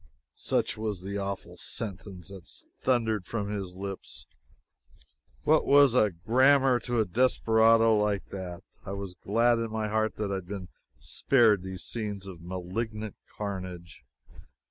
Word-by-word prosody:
Such - - 0
was 105 -4 -3
the 100 +1 -3
awful 100 -1 -5
sentence 95 -4 -5
that 95 -3 -11 0.4
thundered 110 -6 +1
from 105 -3 -3
his 95 -3 -4
lips. 95 0 -6 1.2
What - - +4
was 140 -3 +6 0.3
grammar 130 +2 +5
to 120 +1 -1
a 110 - +3
desperado 115 +1 +4
like 105 -1 0
that? 95 -1 -6 0.2
I 100 - -5
was 100 -2 -5
glad 115 +6 +2
in 115 0 -2
my 110 -1 -2
heart 110 +1 0
that 105 -2 -2
I - - 0
had 90 -2 -8
been 95 -2 -6 0.3
spared 110 - +3
these 95 -1 -6
scenes 105 -4 -4
of 90 -4 -9
malignant 100 +5 -4 0.2
carnage. 90 -6 -6
105 Hz, 140 wpm, -28 LUFS, 95-115 Hz, 1.2 s, was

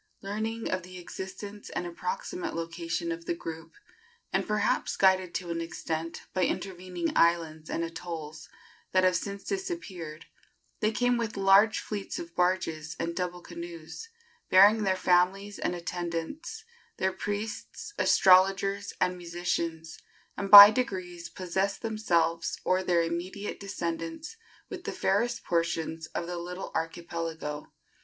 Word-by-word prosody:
Learning 220 +3 -3
of 185 - -1
the 180 +1 -11
existence 195 +3 -8
and 175 - -3
approximate 360 - -4
location 165 0 -3
of 165 0 -5
the 170 - -1
group, 165 0 -8 0.6
and - - +1
perhaps 210 0 +1
guided 185 -2 +4
to 175 -1 -3
an 165 0 -2
extent 165 0 -4
by 185 - +1
intervening 180 -2 -2
islands 165 -2 +2
and 165 - -1
atolls 165 -2 -6 0.4
that 185 0 +4
have 185 -1 +4
since 200 +3 -3
disappeared, 195 - -5 0.5
they 215 - +2
came 245 +2 +2
with 225 -3 -3
large 195 +3 +5
fleets 205 -2 -5
of 170 0 -8
barges 165 -3 0
and 170 0 -2
double 180 -1 -3
canoes, 170 - -8 0.4
bearing 205 +4 +7
their 190 -2 +2
families 185 +3 +2
and 175 - -1
attendants, 175 - -4 0.3
their 190 0 0
priests, 210 - -5
astrologers 195 +2 +4
and 180 - +2
musicians, 170 -1 -3 0.4
and 200 -1 -4
by 205 0 +13
degrees 185 -7 -3
possessed 190 +3 -2
themselves 170 -7 0
or 185 +1 +3
their 175 -2 +2
immediate 175 +5 -4
descendants 170 - -4 0.3
with 365 -2 -8
the - - -2
fairest 230 +5 0
portions 165 -1 -1
of 170 - -4
the 175 0 -4
little 180 +2 -6
archipelago. 165 -2 -4
180 Hz, 135 wpm, -29 LUFS, 170-200 Hz, 0.6 s, by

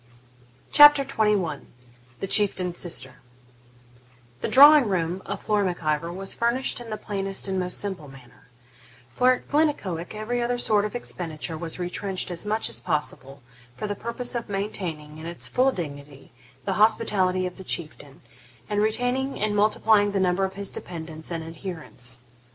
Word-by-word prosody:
CHAPTER 295 -1 +8
XXI 210 - 0 0.6
THE - - -1
CHIEFTAIN'S 185 -3 +2
SISTER 130 -7 0 1.2
The - - -1
drawing 285 -1 +8
room 180 -1 -1
of 200 0 -4
Flora 210 -1 +1
Mac 180 -3 -3
Ivor 155 +2 0
was 195 +2 -4
furnished 240 +2 0
in 235 - -9
the 215 - -4
plainest 195 -2 -2
and 190 -1 -1
most 180 0 -2
simple 190 -7 -5
manner; 135 0 -16 0.6
for 255 +1 +4
at 250 - -7
Glennaquoich 215 - 0
every 235 +3 -2
other 245 +1 0
sort 210 -3 +2
of 210 - -5
expenditure 165 -8 -5
was 165 0 -5
retrenched 185 +1 -3
as 175 +4 -3
much 215 +1 0
as - - -4
possible, 145 -4 -4 0.3
for - - -5
the 205 - -2
purpose 235 +4 -2
of 235 -3 -4
maintaining, 170 -7 -4
in 160 - -7
its 170 0 -5
full 260 +2 +2
dignity, 145 - -8 0.3
the - - 0
hospitality 190 -4 +3
of 180 - -6
the 190 - -7
Chieftain, 150 -5 -4 0.5
and 205 0 0
retaining 245 +5 0
and 210 0 0
multiplying 210 0 +3
the 195 - +1
number 185 +1 +2
of 190 0 -6
his 200 0 -4
dependants 160 -2 -7
and 165 -2 -4
adherents. 160 -7 -7
195 Hz, 160 wpm, -25 LUFS, 165-215 Hz, 1.2 s, CHAPTER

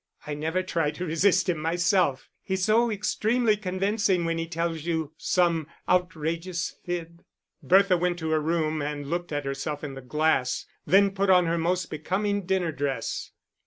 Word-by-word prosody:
I 150 - -4
never 160 +5 -1
try 165 -5 0
to 180 +4 -5
resist 180 +4 +2
him 175 -4 0
myself. 170 -3 +1
He's 190 -1 -1
so 230 +2 +3
extremely 220 +2 +1
convincing 195 -1 0
when 165 0 -1
he 165 - -3
tells 165 -2 -2
you 160 -3 -2
some 170 -4 +1 0.2
outrageous 170 0 -1
fib." 170 -1 -5 0.4
Bertha 190 0 +4
went 175 0 0
to 160 -2 -3
her 155 -1 +2
room 155 -1 0
and 145 0 -3
looked 175 +4 -3
at 145 -1 -2
herself 140 +2 -4
in 145 -2 -5
the 135 - -8
glass, 135 -1 0 0.2
then 200 +1 +5
put 195 0 0
on 180 -2 +6
her 165 0 0
most 175 +1 -1
becoming 195 +5 -1
dinner 185 -3 +1
dress. 135 -5 -3
170 Hz, 165 wpm, -26 LUFS, 155-185 Hz, 0.4 s, on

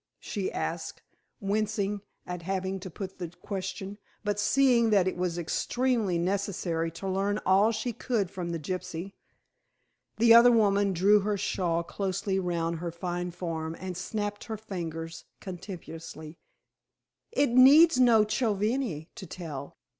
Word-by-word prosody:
she 200 -4 -3
asked, 165 0 -4 0.4
wincing 205 0 -1 0.2
at 180 -1 -5
having 190 +2 -2
to 185 - -7
put 190 +2 -7
the 175 -2 -4
question, 195 +1 -5 0.2
but 205 -1 -1
seeing 245 0 +4
that 195 -4 +4
it 185 - -1
was 175 -1 -2
extremely 220 +3 0
necessary 175 -2 -1
to 165 +4 -7
learn 195 +2 0
all 195 +4 +5
she 230 +2 -2
could 220 -5 -1
from 180 -3 -4
the 170 - -2
gypsy. 180 +3 -5 1.0
The 230 +1 +7
other 235 +1 +9
woman 205 -3 +3
drew 200 +4 +5
her 205 +1 -1
shawl 170 -3 0
closely 190 +1 -2
round 170 -2 -1
her 170 0 -4
fine 175 +1 -3
form 165 -2 -4
and 185 -1 -5
snapped 205 +3 -4
her 220 -1 -4
fingers 165 -6 -6
contemptuously. 165 -4 -8 0.9
"It 285 - +2
needs 270 +4 +7
no 235 -4 +6
chovihani 215 - -1
to 190 - -9
tell. 150 -6 -7
190 Hz, 140 wpm, -28 LUFS, 175-210 Hz, 1.0 s, other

